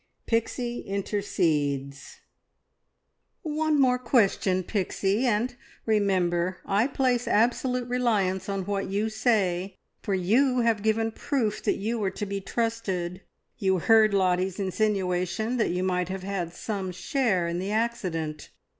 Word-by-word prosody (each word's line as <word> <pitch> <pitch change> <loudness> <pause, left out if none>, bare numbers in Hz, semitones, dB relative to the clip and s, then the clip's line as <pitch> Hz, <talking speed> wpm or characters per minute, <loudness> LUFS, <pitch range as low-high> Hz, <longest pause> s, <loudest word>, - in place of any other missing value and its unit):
PIXIE 240 +1 -1
INTERCEDES. 150 -9 -2 1.2
"One 310 -1 +1
more 250 -2 +4
question, 200 -6 +2
Pixie, 200 +4 0
and 240 +2 0 0.3
remember 185 -4 +1
I 205 +5 +2
place 255 -3 0
absolute 245 +2 +1
reliance 205 -7 0
on 195 -2 -2
what 200 -1 -2
you 205 +3 0
say, 200 -5 0 0.2
for 200 - -1
you 245 +8 +3
have 230 -3 +2
given 220 +1 +1
proof 225 -3 -1
that - - +2
you 225 +2 -2
are 195 - +1
to 205 +2 -5
be 200 0 -4
trusted. 195 -5 -2 0.4
You 190 -1 +2
heard 220 +4 +5
Lottie's 185 0 +1
insinuation 195 +2 0
that 225 - +1
you 180 +1 -1
might 180 -1 0
have 190 0 -4
had 190 -3 -3
some 195 -4 -3
share 185 0 0
in 170 +1 -2
the 190 +2 -3
accident! 185 -9 -2
200 Hz, 130 wpm, -27 LUFS, 185-230 Hz, 1.2 s, heard